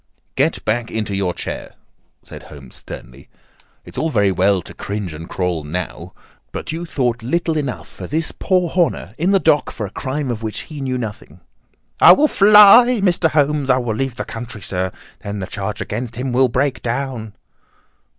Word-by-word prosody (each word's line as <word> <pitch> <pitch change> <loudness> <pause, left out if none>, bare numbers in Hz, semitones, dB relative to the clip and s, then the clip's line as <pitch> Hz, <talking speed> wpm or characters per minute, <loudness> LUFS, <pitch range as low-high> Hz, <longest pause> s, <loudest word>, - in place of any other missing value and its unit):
"Get - - 0
back 120 -1 0
into 105 -3 -3
your 95 -2 0
chair!" - - -6 0.5
said - - -11
Holmes 70 -4 -12
sternly. 65 +2 -11 0.6
"It - - -7
is 160 - 0
very 100 -6 +3
well 95 -1 +2
to - - -11
cringe 100 -4 -5
and 80 +2 -9
crawl 90 -4 -2
now, 75 -5 -5 0.4
but - - -5
you 170 +2 -5
thought 125 -5 -1
little 160 +7 -1
enough 140 -5 -5
of - - -6
this 160 +1 -1
poor 185 -2 +1
Horner 165 - 0
in 175 +4 +1
the 195 - +5
dock 155 -4 +2
for 110 - -5
a 95 - -8
crime 135 +1 -3
of 115 -2 -4
which 110 -1 -4
he 150 -3 -9
knew 130 -1 -2
nothing." 105 -8 -7 0.6
"I - - +10
will 300 +11 +4
fly, 215 +3 +7
Mr. 175 -3 +3
Holmes. 145 -2 +1
I 130 - +5
will 120 -3 -1
leave 130 +2 -2
the - - -4
country, 115 -2 -7
sir. 95 0 -2 0.3
Then 100 0 -4
the 95 - -4
charge 100 +2 -5
against 120 +2 -4
him 125 +2 -3
will 130 +1 +3
break 130 +3 0
down." 120 -4 -3
120 Hz, 185 wpm, -19 LUFS, 100-150 Hz, 0.6 s, I